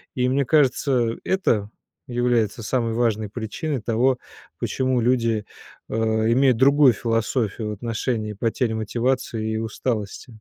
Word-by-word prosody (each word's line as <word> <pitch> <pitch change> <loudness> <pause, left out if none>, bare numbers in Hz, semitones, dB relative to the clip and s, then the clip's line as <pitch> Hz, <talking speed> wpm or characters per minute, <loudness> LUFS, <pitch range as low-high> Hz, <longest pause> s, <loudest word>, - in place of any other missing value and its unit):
И, 125 0 +1
мне 135 0 +1
кажется, 130 -4 +2
это 110 - +1 0.4
является 120 -2 0
самой 115 -1 0
важной 110 -3 0
причиной 120 +5 -4
того, 125 +4 +1 0.4
почему 130 -1 0
люди, 115 -3 +1 0.4
а, - - -3 0.4
имеют 130 -1 +4
другую 140 0 +6
философию 115 -1 -1
в - - -3
отношении 110 0 -3
потери 115 +2 -1
мотивации 110 0 -1
и - - -1
усталости. 110 -1 -3
115 Hz, 120 wpm, -23 LUFS, 110-130 Hz, 0.4 s, другую